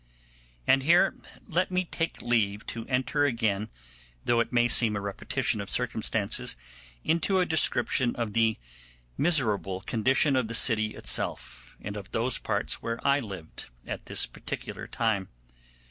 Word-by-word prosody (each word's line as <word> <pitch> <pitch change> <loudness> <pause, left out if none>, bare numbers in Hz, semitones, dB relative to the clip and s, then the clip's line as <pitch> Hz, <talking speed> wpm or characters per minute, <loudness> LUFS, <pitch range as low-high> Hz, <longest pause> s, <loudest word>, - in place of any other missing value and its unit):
And 135 - +4
here 170 +7 +4 0.3
let 180 +1 +1
me 185 0 0
take 165 -1 -3
leave 105 -4 +1
to 115 -1 -6
enter 130 +3 +1
again, 110 -6 0 0.6
though 120 - +3
it 115 - 0
may 120 -1 +3
seem 115 -3 +3
a - - -1
repetition 100 +1 -2
of 100 - -7
circumstances, 110 - 0 0.5
into 170 +4 +2
a 180 - +3
description 130 -6 +2
of 115 -3 -3
the 115 0 +2 0.6
miserable 110 - +1
condition 130 +7 +2
of 130 -3 +1
the 115 - -1
city 110 -2 +3
itself, - - -2
and 105 0 -6
of 100 -2 -7
those 115 +3 0
parts - - -1
where 115 0 -3
I 140 +1 +4
lived 95 - -8 0.2
at - - -6
this - - +1
particular - - -7
time. 110 -5 -1
115 Hz, 145 wpm, -28 LUFS, 105-135 Hz, 0.6 s, And